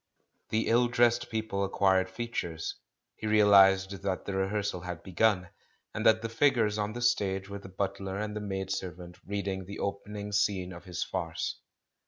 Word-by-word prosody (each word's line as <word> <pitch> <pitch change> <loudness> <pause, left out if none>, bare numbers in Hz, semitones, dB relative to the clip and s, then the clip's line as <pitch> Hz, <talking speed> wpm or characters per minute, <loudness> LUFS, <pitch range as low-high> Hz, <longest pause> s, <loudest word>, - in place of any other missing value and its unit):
The 110 +1 +1
ill 120 +1 +4
dressed 120 0 +2
people 110 -3 -2
acquired 95 -1 +2
features; 95 -6 -4 0.4
he 110 - -4
realised 100 -2 +5
that 95 -2 -2
the 100 - -3
rehearsal 95 -1 -1
had 90 -2 -6
begun, 95 -1 +1 0.4
and 105 - -3
that 110 0 +5
the - - 0
figures 115 -4 +2
on 105 +1 -1
the 120 +1 -4
stage 100 -5 +1
were 100 0 -5
the 95 - -11
butler 95 0 -3
and 105 0 -3
the 105 - -3
maid 95 -2 -3
servant 90 -1 -5
reading 100 -2 -3
the 100 +2 -7
opening 100 +1 -4
scene 100 -3 0
of 85 - -11
his 90 -3 -3
farce. - - -3
100 Hz, 170 wpm, -30 LUFS, 95-105 Hz, 0.4 s, realised